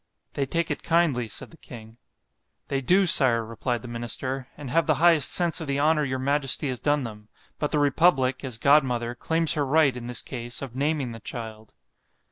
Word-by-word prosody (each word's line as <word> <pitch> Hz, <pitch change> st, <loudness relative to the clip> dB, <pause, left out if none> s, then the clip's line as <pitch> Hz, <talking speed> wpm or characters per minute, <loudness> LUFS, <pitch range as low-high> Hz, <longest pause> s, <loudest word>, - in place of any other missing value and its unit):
—They 140 Hz, -1 st, -2 dB
take 170 Hz, +3 st, -1 dB
it -, -, -4 dB
kindly, 160 Hz, -8 st, +1 dB
said 110 Hz, -, -7 dB
the 165 Hz, -, -13 dB
king.—They 120 Hz, +3 st, -10 dB
do, 185 Hz, +8 st, +3 dB
Sire, 125 Hz, -8 st, +5 dB
replied 120 Hz, +2 st, -4 dB
the -, -, -8 dB
minister, 120 Hz, +3 st, -4 dB
and 140 Hz, -4 st, -8 dB
have 165 Hz, +5 st, +1 dB
the 155 Hz, -, +3 dB
highest 160 Hz, -3 st, +4 dB
sense 175 Hz, -1 st, +1 dB
of 160 Hz, -, -6 dB
the 140 Hz, 0 st, -1 dB
honour 150 Hz, +1 st, +2 dB
your 130 Hz, -2 st, -2 dB
majesty 140 Hz, +1 st, +1 dB
has 125 Hz, -2 st, -4 dB
done 145 Hz, -1 st, 0 dB
them——but 110 Hz, +6 st, -8 dB
the 150 Hz, -, 0 dB
republick, 140 Hz, -3 st, +2 dB
as 130 Hz, -4 st, -4 dB
godmother, 125 Hz, -3 st, +2 dB
claims 160 Hz, +6 st, +1 dB
her 150 Hz, -, -1 dB
right, 140 Hz, -1 st, +2 dB
in 120 Hz, -1 st, -7 dB
this 125 Hz, -, -2 dB
case, 120 Hz, 0 st, -6 dB
of 125 Hz, -3 st, -8 dB
naming 140 Hz, -2 st, -1 dB
the 115 Hz, -, -9 dB
child. 110 Hz, -, -9 dB
135 Hz, 190 wpm, -25 LUFS, 120-150 Hz, -, Sire